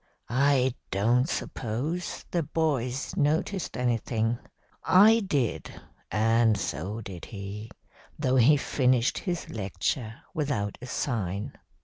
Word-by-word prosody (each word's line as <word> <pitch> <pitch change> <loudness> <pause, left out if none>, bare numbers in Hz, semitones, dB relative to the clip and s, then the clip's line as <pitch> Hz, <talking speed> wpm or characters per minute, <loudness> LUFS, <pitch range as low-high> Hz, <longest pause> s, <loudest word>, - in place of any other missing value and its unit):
I 130 0 +3 0.2
don't 120 - +2
suppose 140 +11 -3
the 175 - +1
boys 140 -5 -1
noticed 160 +6 0
anything. 115 -1 0 0.4
I 215 +5 +7
did, 145 - -2 0.3
and 115 0 +3
so 100 - -3
did 95 -5 -8
he, 105 +1 -7 0.5
though 130 -3 +2
he 135 +5 +6
finished 130 -3 +2
his 175 -3 -3
lecture 110 - -3
without 135 - -2
a 125 - -7
sign. 105 -7 -2
125 Hz, 105 wpm, -28 LUFS, 110-145 Hz, 0.5 s, I